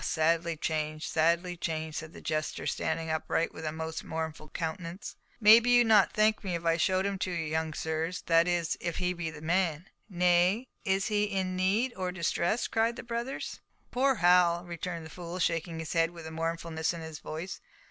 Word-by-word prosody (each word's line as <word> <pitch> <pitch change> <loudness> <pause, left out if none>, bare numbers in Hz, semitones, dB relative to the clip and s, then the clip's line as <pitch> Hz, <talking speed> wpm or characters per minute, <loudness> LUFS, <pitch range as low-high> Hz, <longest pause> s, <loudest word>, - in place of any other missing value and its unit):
sadly 165 +1 +1
changed, 155 0 -2
sadly 170 +2 +1
changed," 160 -2 -3
said 160 -1 -6
the - - -12
jester, 155 0 -2
standing 160 -1 -1
upright, 160 +1 0
with 160 - -8
a 155 - -2
most 160 0 -5
mournful 160 -1 -5
countenance. 170 +3 -5 0.2
"Maybe 225 +2 +7
you'd 245 -1 +6
not 215 -3 +5
thank 215 +1 +2
me 185 -3 -2
if 170 0 -5
I 165 0 +4
showed 185 +3 +2
him 200 -1 -2
to 185 - -1
you, 170 -2 -2
young 160 0 -2
sirs, 160 +2 -2
that 165 0 +4
is, 175 -2 0
if 170 -1 -3
he 180 0 0
be 175 -2 -4
the 150 -1 -10
man." 170 0 0 0.2
"Nay! 180 +5 +3 0.2
is 195 0 +1
he 210 -1 +2
in 190 -2 -2
need, 205 +7 +1
or 185 -1 -2
distress?" 175 +4 0
cried 225 +1 +1
the - - -7
brothers. 235 +3 -4 0.3
"Poor 265 +2 +3
Hal!" 175 -2 +4
returned 170 -1 -5
the 160 - -10
fool, 175 0 -6
shaking 165 -1 -1
his 160 -1 -4
head 165 -1 +3
with 170 -2 -10
mournfulness 165 0 -2
in 170 - -7
his 160 -2 -7
voice. 165 +5 -6
170 Hz, 190 wpm, -30 LUFS, 160-190 Hz, 0.3 s, Maybe